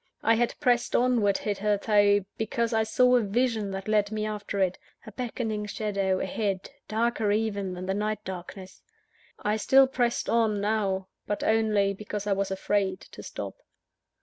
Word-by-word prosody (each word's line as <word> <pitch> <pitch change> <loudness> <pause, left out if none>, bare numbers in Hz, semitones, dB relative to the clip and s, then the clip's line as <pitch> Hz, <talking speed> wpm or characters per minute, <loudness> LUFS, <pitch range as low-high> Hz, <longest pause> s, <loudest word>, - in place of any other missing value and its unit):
I 230 - +5
had 235 +1 0
pressed 245 -4 +2
onward, 235 -6 +3
hitherto, 205 0 +2
because 230 +2 -1
I 220 - +3
saw 250 +3 +4
a - - +2
vision 220 0 0
that 195 +1 -5
led 210 -1 +2
me 215 0 -2
after 210 -1 -4
it 185 -1 +1 0.3
a 220 - -9
beckoning 220 -2 -3
shadow, 200 -3 -1
ahead, 195 -1 -2 0.2
darker 225 -1 0
even 205 -3 -1
than 180 +1 -6
the 190 - -1
night 210 +1 -2
darkness. 185 +1 -8 0.6
I 210 +1 -1
still 265 +5 +6
pressed 245 -2 0
on, 225 -3 +2
now; 200 -2 -1 0.2
but 205 - -2
only 215 -3 +2
because 210 0 -5
I 205 - +2
was 195 0 -1
afraid 190 0 0
to - - -10
stop. - - -7
210 Hz, 160 wpm, -27 LUFS, 200-225 Hz, 0.6 s, still